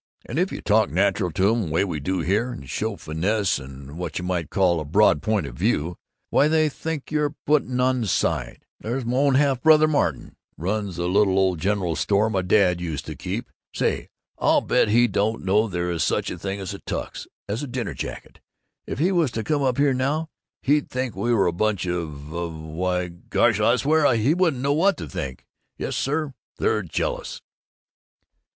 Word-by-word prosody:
And 135 Hz, -, -3 dB
if 185 Hz, +2 st, +1 dB
you -, -, -5 dB
talk 110 Hz, 0 st, +3 dB
natural 95 Hz, +1 st, +1 dB
to 95 Hz, +5 st, +3 dB
'em, 110 Hz, -8 st, -1 dB
way 80 Hz, +5 st, +2 dB
we 85 Hz, -6 st, -3 dB
do 90 Hz, +5 st, -1 dB
here, 105 Hz, +9 st, 0 dB
and 70 Hz, -, -9 dB
show 110 Hz, +8 st, -2 dB
finesse 95 Hz, +4 st, 0 dB
and 70 Hz, +3 st, -10 dB
what 90 Hz, -3 st, -4 dB
you 90 Hz, -, -3 dB
might 90 Hz, -4 st, -2 dB
call 90 Hz, -4 st, +2 dB
a -, -, -3 dB
broad 85 Hz, 0 st, +3 dB
point 110 Hz, +2 st, 0 dB
of -, -, -7 dB
view, 80 Hz, +7 st, 0 dB, 0.4 s
why, 145 Hz, -, +4 dB
they 155 Hz, 0 st, +3 dB
think 155 Hz, 0 st, -5 dB
you're 150 Hz, -1 st, 0 dB
putting 135 Hz, -4 st, +1 dB
on 130 Hz, -1 st, +2 dB
side. -, -, -1 dB
There's 120 Hz, +3 st, -3 dB
my 125 Hz, +2 st, 0 dB
own 140 Hz, -1 st, +3 dB
half 135 Hz, -2 st, +2 dB
brother 155 Hz, +1 st, +6 dB
Martin 150 Hz, -2 st, -1 dB, 0.2 s
runs 100 Hz, +2 st, -2 dB
the 85 Hz, +1 st, -2 dB
little 95 Hz, 0 st, +3 dB
ole 95 Hz, -1 st, +3 dB
general 90 Hz, -1 st, -1 dB
store 105 Hz, +5 st, +1 dB
my 95 Hz, -3 st, +1 dB
Dad 90 Hz, -1 st, +3 dB
used 80 Hz, -5 st, -4 dB
to -, -, -6 dB
keep. -, -, -5 dB, 0.2 s
Say, -, -, 0 dB, 0.3 s
I'll -, -, +4 dB
bet -, -, +2 dB
he 120 Hz, +3 st, +4 dB
don't 110 Hz, -1 st, -1 dB
know 105 Hz, +4 st, +3 dB
there 90 Hz, -2 st, -2 dB
is 85 Hz, -3 st, 0 dB
such -, -, 0 dB
a -, -, -6 dB
thing 100 Hz, 0 st, -4 dB
as 95 Hz, 0 st, -5 dB
a 100 Hz, -, -8 dB
Tux -, -, -5 dB, 0.2 s
as 105 Hz, +4 st, -2 dB
a 145 Hz, -, -4 dB
dinner 125 Hz, -3 st, -3 dB
jacket. -, -, -7 dB, 0.5 s
If -, -, -4 dB
he 170 Hz, +7 st, +2 dB
was 170 Hz, -6 st, +2 dB
to 110 Hz, -, -2 dB
come 145 Hz, +6 st, 0 dB
in 130 Hz, -2 st, +1 dB
here 140 Hz, 0 st, +3 dB
now, 145 Hz, +5 st, -1 dB, 0.3 s
he'd 145 Hz, +1 st, +2 dB
think 130 Hz, -4 st, -3 dB
we 110 Hz, +5 st, -1 dB
were 110 Hz, -5 st, +3 dB
a 85 Hz, -, +1 dB
bunch 105 Hz, +1 st, 0 dB
of 80 Hz, -4 st, -4 dB
of 85 Hz, -1 st, -4 dB
Why, 90 Hz, +3 st, -2 dB
gosh, 85 Hz, 0 st, +1 dB
I -, -, +4 dB
swear, 155 Hz, +1 st, +3 dB
he 115 Hz, +7 st, +3 dB
wouldn't 165 Hz, -8 st, +1 dB
know 140 Hz, +1 st, +2 dB
what 190 Hz, +6 st, +3 dB
to -, -, -6 dB
think! 65 Hz, -1 st, -6 dB, 0.3 s
Yes, -, -, -3 dB
sir, 145 Hz, +1 st, -1 dB, 0.2 s
they're -, -, +1 dB
jealous!" -, -, -3 dB
105 Hz, 200 wpm, -24 LUFS, 90-135 Hz, 0.5 s, brother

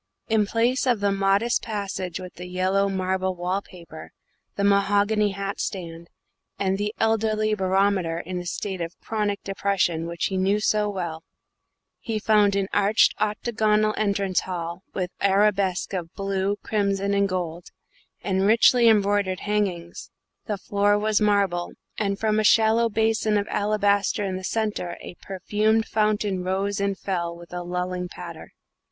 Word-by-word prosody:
In 215 Hz, -2 st, +2 dB
place 240 Hz, +5 st, +1 dB
of 240 Hz, -4 st, +2 dB
the 200 Hz, 0 st, +1 dB
modest 195 Hz, +4 st, +2 dB
passage 195 Hz, -4 st, -4 dB
with 180 Hz, -1 st, -9 dB
the 180 Hz, +1 st, -9 dB
yellow 185 Hz, +2 st, +1 dB
marble 190 Hz, -1 st, -1 dB
wall 180 Hz, +3 st, -1 dB
paper, 170 Hz, -5 st, -12 dB, 0.4 s
the 200 Hz, -, -1 dB
mahogany 205 Hz, +1 st, +3 dB
hat 200 Hz, +1 st, -4 dB
stand, 170 Hz, -3 st, -5 dB, 0.5 s
and 195 Hz, 0 st, 0 dB
the 210 Hz, 0 st, -1 dB
elderly 215 Hz, -1 st, +1 dB
barometer 190 Hz, -3 st, +1 dB
in 180 Hz, +1 st, -4 dB
a 175 Hz, -, -7 dB
state 190 Hz, 0 st, -4 dB
of 165 Hz, +1 st, -6 dB
chronic 210 Hz, -2 st, -2 dB
depression 195 Hz, -4 st, 0 dB
which 170 Hz, 0 st, -2 dB
he 190 Hz, -, -1 dB
knew 195 Hz, +3 st, +2 dB
so 210 Hz, 0 st, +1 dB
well, 170 Hz, -5 st, -4 dB, 0.8 s
he 225 Hz, -3 st, -3 dB
found 210 Hz, -2 st, +3 dB
an 195 Hz, -1 st, 0 dB
arched 205 Hz, +2 st, +4 dB
octagonal 215 Hz, 0 st, +1 dB
entrance 200 Hz, -3 st, 0 dB
hall 170 Hz, -1 st, -5 dB
with 180 Hz, -1 st, -2 dB
arabesques 195 Hz, -2 st, +2 dB
of 175 Hz, -3 st, -4 dB
blue, 195 Hz, 0 st, -1 dB
crimson, 200 Hz, -1 st, 0 dB
and 200 Hz, 0 st, +2 dB
gold, 175 Hz, -2 st, -4 dB, 0.6 s
and 190 Hz, 0 st, +1 dB
richly 235 Hz, +2 st, +5 dB
embroidered 200 Hz, -3 st, +2 dB
hangings; 195 Hz, -5 st, -2 dB, 0.4 s
the 210 Hz, -3 st, -2 dB
floor 205 Hz, +1 st, +1 dB
was 215 Hz, 0 st, +1 dB
marble, 200 Hz, -4 st, +1 dB, 0.3 s
and 200 Hz, -2 st, 0 dB
from 215 Hz, 0 st, +1 dB
a -, -, +1 dB
shallow 225 Hz, +2 st, +4 dB
basin 220 Hz, -1 st, +1 dB
of 205 Hz, 0 st, -1 dB
alabaster 205 Hz, 0 st, +1 dB
in 190 Hz, -2 st, -2 dB
the 185 Hz, -, -6 dB
centre 210 Hz, -5 st, -2 dB
a -, -, -8 dB
perfumed 210 Hz, +4 st, 0 dB
fountain 210 Hz, -3 st, 0 dB
rose 195 Hz, +2 st, -1 dB
and 200 Hz, -1 st, 0 dB
fell 170 Hz, -3 st, -3 dB
with 175 Hz, 0 st, -13 dB
a 180 Hz, -, -3 dB
lulling 180 Hz, +1 st, -3 dB
patter. 170 Hz, -2 st, -10 dB
200 Hz, 150 wpm, -24 LUFS, 185-210 Hz, 0.8 s, richly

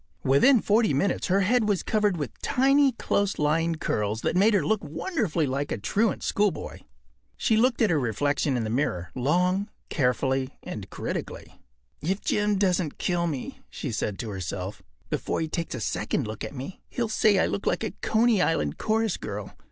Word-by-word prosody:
Within 215 Hz, -, +5 dB
forty 215 Hz, -, +3 dB
minutes 185 Hz, +7 st, 0 dB
her 195 Hz, +2 st, +3 dB
head 220 Hz, +2 st, +2 dB
was 200 Hz, -3 st, +1 dB
covered 210 Hz, -4 st, +1 dB
with 145 Hz, -7 st, -6 dB
tiny, 275 Hz, +1 st, +4 dB
close 200 Hz, -3 st, 0 dB
lying 165 Hz, +3 st, +1 dB
curls 105 Hz, -6 st, -1 dB
that -, -, 0 dB
made 205 Hz, +4 st, +4 dB
her 175 Hz, -7 st, +2 dB
look 215 Hz, +6 st, +1 dB
wonderfully 170 Hz, -, -1 dB
like 140 Hz, +1 st, -2 dB
a -, -, -1 dB
truant 200 Hz, -, 0 dB
schoolboy. 205 Hz, -2 st, -1 dB, 0.6 s
She 225 Hz, -, +2 dB
looked 240 Hz, +1 st, +3 dB
at 210 Hz, -, +3 dB
her 155 Hz, -, +3 dB
reflection 140 Hz, +3 st, 0 dB
in 120 Hz, -, -1 dB
the 110 Hz, -, -3 dB
mirror 90 Hz, -, -1 dB
long, 180 Hz, -, +1 dB, 0.2 s
carefully, 130 Hz, 0 st, 0 dB
and -, -, -7 dB
critically. -, -, -6 dB, 0.4 s
“If 190 Hz, +6 st, -1 dB
Jim 210 Hz, -1 st, +1 dB
doesn’t 180 Hz, -5 st, +1 dB
kill 175 Hz, -1 st, 0 dB
me,” 140 Hz, -6 st, -5 dB
she -, -, -5 dB
said 100 Hz, -2 st, -2 dB
to 115 Hz, -, -5 dB
herself, 95 Hz, +1 st, -5 dB, 0.3 s
“before -, -, -1 dB
he 160 Hz, -, -1 dB
takes 165 Hz, -1 st, -3 dB
a -, -, -4 dB
second 110 Hz, -, -1 dB
look 110 Hz, 0 st, -6 dB
at -, -, -6 dB
me, 135 Hz, +8 st, -7 dB
he’ll 240 Hz, -3 st, -1 dB
say 215 Hz, -1 st, +3 dB
I -, -, +4 dB
look 200 Hz, -, -3 dB
like -, -, +1 dB
a 220 Hz, -, -2 dB
Coney 220 Hz, -2 st, +3 dB
Island 75 Hz, -, 0 dB
chorus 220 Hz, -2 st, +1 dB
girl. 100 Hz, 0 st, -6 dB
175 Hz, 185 wpm, -26 LUFS, 135-210 Hz, 0.6 s, Within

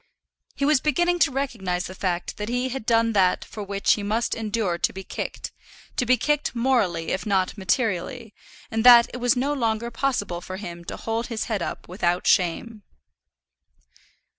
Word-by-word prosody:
He 280 Hz, -, -1 dB
was 295 Hz, -2 st, +3 dB
beginning 345 Hz, +4 st, +1 dB
to 320 Hz, -, +4 dB
recognize 215 Hz, -10 st, -2 dB
the 185 Hz, -, -7 dB
fact 180 Hz, -2 st, -3 dB
that 210 Hz, +1 st, -4 dB
he 245 Hz, +2 st, -1 dB
had 255 Hz, -3 st, -6 dB
done 230 Hz, -1 st, +3 dB
that 185 Hz, -3 st, +2 dB
for 215 Hz, -, -8 dB
which 200 Hz, 0 st, +1 dB
he 210 Hz, -, -3 dB
must 215 Hz, +3 st, -1 dB
endure 215 Hz, -5 st, -1 dB
to -, -, +1 dB
be 190 Hz, +1 st, -8 dB
kicked, -, -, -5 dB, 0.4 s
to 250 Hz, -, -1 dB
be 255 Hz, +1 st, +5 dB
kicked 295 Hz, -2 st, 0 dB
morally 220 Hz, -10 st, +1 dB
if 190 Hz, -, -1 dB
not 190 Hz, -3 st, 0 dB
materially; 215 Hz, +2 st, -1 dB, 0.4 s
and 225 Hz, 0 st, 0 dB
that 240 Hz, -1 st, +8 dB
it -, -, -4 dB
was 245 Hz, 0 st, +2 dB
no 275 Hz, +4 st, 0 dB
longer 235 Hz, -3 st, -1 dB
possible 230 Hz, -9 st, -1 dB
for 185 Hz, +1 st, -7 dB
him 175 Hz, -4 st, -8 dB
to -, -, -6 dB
hold 225 Hz, +1 st, -3 dB
his 230 Hz, -3 st, -3 dB
head 215 Hz, -5 st, -2 dB
up -, -, -5 dB
without 175 Hz, -1 st, -1 dB
shame. 205 Hz, +5 st, +1 dB
225 Hz, 180 wpm, -24 LUFS, 190-245 Hz, 0.4 s, that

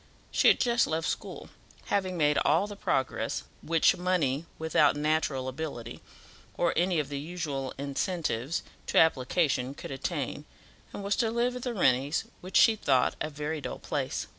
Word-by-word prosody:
She -, -, +3 dB
had -, -, +6 dB
just 235 Hz, -1 st, +3 dB
left 160 Hz, +1 st, -1 dB
school, -, -, -5 dB, 0.3 s
having 185 Hz, -3 st, -1 dB
made 150 Hz, -2 st, +3 dB
all 160 Hz, +6 st, +3 dB
the 205 Hz, 0 st, -7 dB
progress 135 Hz, -9 st, -1 dB, 0.2 s
which 165 Hz, 0 st, +3 dB
money 165 Hz, -5 st, 0 dB
without 155 Hz, -2 st, +3 dB
natural 150 Hz, -3 st, 0 dB
ability 130 Hz, -4 st, -6 dB, 0.6 s
or 170 Hz, -1 st, +2 dB
any 175 Hz, +1 st, +2 dB
of 145 Hz, -2 st, -2 dB
the 140 Hz, -1 st, -3 dB
usual 145 Hz, -4 st, -4 dB
incentives 140 Hz, -1 st, -2 dB, 0.2 s
to -, -, 0 dB
application 135 Hz, -3 st, +2 dB
could -, -, -8 dB
attain, 135 Hz, -, -3 dB, 0.5 s
and 200 Hz, -, -7 dB
was 200 Hz, +1 st, +1 dB
to 230 Hz, -3 st, +2 dB
live 240 Hz, +2 st, 0 dB
at 250 Hz, -, -5 dB
the 245 Hz, -1 st, -3 dB
Rennies', 140 Hz, -4 st, +2 dB, 0.2 s
which 185 Hz, +1 st, 0 dB
she 225 Hz, -, +6 dB
thought 130 Hz, -11 st, +2 dB
a 150 Hz, -, -1 dB
very 150 Hz, +1 st, -4 dB
dull -, -, -5 dB
place. -, -, -3 dB
160 Hz, 165 wpm, -29 LUFS, 140-180 Hz, 0.6 s, had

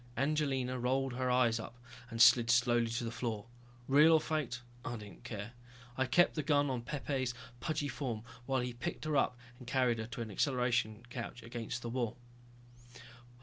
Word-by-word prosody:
Angelina 135 Hz, -3 st, 0 dB
rolled 130 Hz, +1 st, 0 dB
her 130 Hz, 0 st, -1 dB
eyes 120 Hz, -2 st, +3 dB
up 115 Hz, +2 st, -8 dB, 0.3 s
and 115 Hz, -1 st, -6 dB
slid 115 Hz, 0 st, +7 dB
slowly 120 Hz, -1 st, +4 dB
to 115 Hz, +1 st, -2 dB
the 115 Hz, -, -3 dB
floor. 115 Hz, -3 st, -3 dB, 0.4 s
Real 150 Hz, +4 st, +7 dB
or 160 Hz, -, +7 dB
faked, 150 Hz, -7 st, -2 dB, 0.2 s
I 120 Hz, -, -3 dB
didn't 105 Hz, +1 st, -11 dB
care. 110 Hz, -2 st, -6 dB, 0.4 s
I 130 Hz, -1 st, +1 dB
kept 175 Hz, +7 st, +4 dB
the 155 Hz, -, -1 dB
gun 145 Hz, -1 st, +2 dB
on 125 Hz, -2 st, -2 dB
Pepe's 130 Hz, -1 st, -2 dB, 0.2 s
pudgy 145 Hz, +2 st, -1 dB
form 125 Hz, -5 st, -3 dB, 0.2 s
while 135 Hz, -2 st, +1 dB
he 125 Hz, 0 st, -3 dB
picked 160 Hz, +7 st, -5 dB
her 155 Hz, -1 st, 0 dB
up 130 Hz, -2 st, +2 dB, 0.2 s
and 125 Hz, -, -12 dB
carried 125 Hz, -3 st, +2 dB
her 110 Hz, -, -4 dB
to 115 Hz, 0 st, -6 dB
an 110 Hz, -, -8 dB
acceleration 120 Hz, -2 st, 0 dB
couch 120 Hz, 0 st, -6 dB
against 120 Hz, 0 st, -5 dB
the 120 Hz, -, -3 dB
wall. 120 Hz, -2 st, -2 dB
125 Hz, 180 wpm, -34 LUFS, 115-135 Hz, 0.4 s, slid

